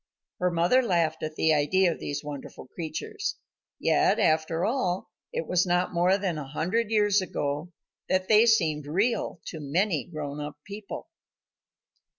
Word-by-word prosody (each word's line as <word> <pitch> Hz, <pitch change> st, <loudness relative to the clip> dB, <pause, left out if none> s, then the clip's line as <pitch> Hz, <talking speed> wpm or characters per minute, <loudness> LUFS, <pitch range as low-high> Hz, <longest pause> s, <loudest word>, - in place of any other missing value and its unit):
Her 180 Hz, -, +2 dB
mother 175 Hz, +9 st, +3 dB
laughed 170 Hz, -8 st, +1 dB
at 155 Hz, 0 st, -4 dB
the 160 Hz, 0 st, +3 dB
idea 170 Hz, +5 st, +3 dB
of -, -, -6 dB
these 145 Hz, 0 st, -4 dB
wonderful 145 Hz, -3 st, -8 dB
creatures. 180 Hz, -, -4 dB, 0.4 s
Yet, -, -, +3 dB
after 160 Hz, +2 st, +2 dB
all, 190 Hz, -7 st, -1 dB, 0.2 s
it 165 Hz, -, -3 dB
was 180 Hz, +2 st, +2 dB
not 180 Hz, +1 st, +1 dB
more 180 Hz, +3 st, +3 dB
than 185 Hz, -6 st, -2 dB
a 140 Hz, -, -6 dB
hundred 185 Hz, +10 st, -1 dB
years 205 Hz, -2 st, +3 dB
ago 150 Hz, -1 st, -3 dB, 0.4 s
that 185 Hz, 0 st, +1 dB
they 220 Hz, +2 st, +6 dB
seemed 155 Hz, -10 st, +2 dB
real 195 Hz, +3 st, 0 dB
to 160 Hz, -, -6 dB
many 160 Hz, +2 st, 0 dB
grown 150 Hz, -3 st, -6 dB
up 150 Hz, 0 st, -6 dB
people. 200 Hz, 0 st, -7 dB
175 Hz, 155 wpm, -27 LUFS, 155-200 Hz, 0.4 s, they